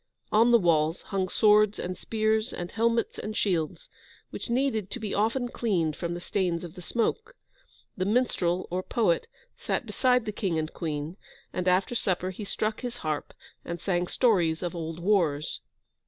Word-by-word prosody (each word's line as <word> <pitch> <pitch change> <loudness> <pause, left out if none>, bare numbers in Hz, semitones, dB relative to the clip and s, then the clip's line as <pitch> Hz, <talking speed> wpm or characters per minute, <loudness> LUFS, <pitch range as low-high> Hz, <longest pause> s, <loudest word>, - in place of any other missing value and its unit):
On 225 +3 +5
the 240 - +7
walls 165 -4 +2
hung 190 -2 -1
swords 210 0 +5
and 180 +1 -3
spears 220 +3 0
and 175 0 -5
helmets 230 +1 +1
and 215 0 -4
shields, 180 - 0 0.4
which - - -6
needed 235 -5 +1
to 245 - -4
be 215 -3 -3
often 230 +5 +1
cleaned 175 -11 0
from 170 0 -3
the - - -4
stains 175 -2 -1
of 170 -2 -7
the 180 - -10
smoke. 440 - -1 0.6
The 185 - -1
minstrel 195 -6 +1
or 180 +1 0
poet 185 -4 +1 0.3
sat - - -1
beside 250 -3 +2
the 210 - -2
King 190 -5 -1
and 155 0 -2
Queen, 155 +1 -4 0.4
and, 180 0 -2
after 185 +5 +3
supper 185 -5 0
he 205 +3 -7
struck 215 +2 -2
his 245 -1 -4
harp, 155 -1 -2 0.3
and 170 0 -5
sang 175 -1 0
stories 175 -10 +2
of 175 - -2
old 165 -1 -4
wars. 170 -6 +1
190 Hz, 170 wpm, -28 LUFS, 170-225 Hz, 0.6 s, the